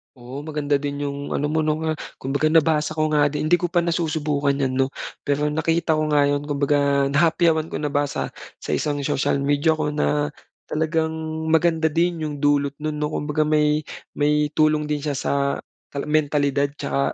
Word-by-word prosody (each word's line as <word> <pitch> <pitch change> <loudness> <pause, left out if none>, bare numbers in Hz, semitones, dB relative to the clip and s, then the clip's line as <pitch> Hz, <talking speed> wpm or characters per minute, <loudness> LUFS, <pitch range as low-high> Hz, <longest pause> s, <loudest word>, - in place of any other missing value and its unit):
Oo 125 +2 -8
maganda 150 -2 0
din 145 0 -3
'yung 140 0 -4
ano 145 +1 -1
mo 160 - +1
'no 155 -1 +1
nga, 160 - 0 0.2
kumbaga 140 +3 0
nabasa 155 -1 +2
ko 155 0 0
nga 150 -1 +4
di 150 +1 -3
hindi 175 +3 +3
ko 175 - 0
pa 175 0 +1
nasusubukan 155 -4 0
'yan 135 -2 0
'no, 130 0 +1 0.4
pero 145 +1 +1
nakita 165 +2 0
ko 155 0 +1
nga 150 -1 +3
'yun 145 0 +2
kumbaga 140 -1 +1
nahapyawan 160 +1 +3
ko, - - -7
nabasa 145 -1 -1 0.2
sa - - -6
isang 150 -1 0
social 140 +1 0
media 145 +3 +2
ko 150 -1 -1
na, 150 0 0 0.4
talagang 160 +1 0 0.4
maganda 160 -1 +3
din 170 +1 0
'yung 150 -2 -4
dulot 145 -1 +2
nun 155 0 -3
'no? 150 0 -2
Kumbaga 150 +1 0
may 150 0 +2 0.3
may 150 +1 +2
tulong 155 -1 +2
din 150 -1 -2
siya 145 -3 -2
sa 140 0 0 0.3
ta 140 - -5
mentalidad 145 -2 +1
at 140 - -18
saka 70 -1 -1
150 Hz, 180 wpm, -22 LUFS, 145-155 Hz, 0.4 s, nga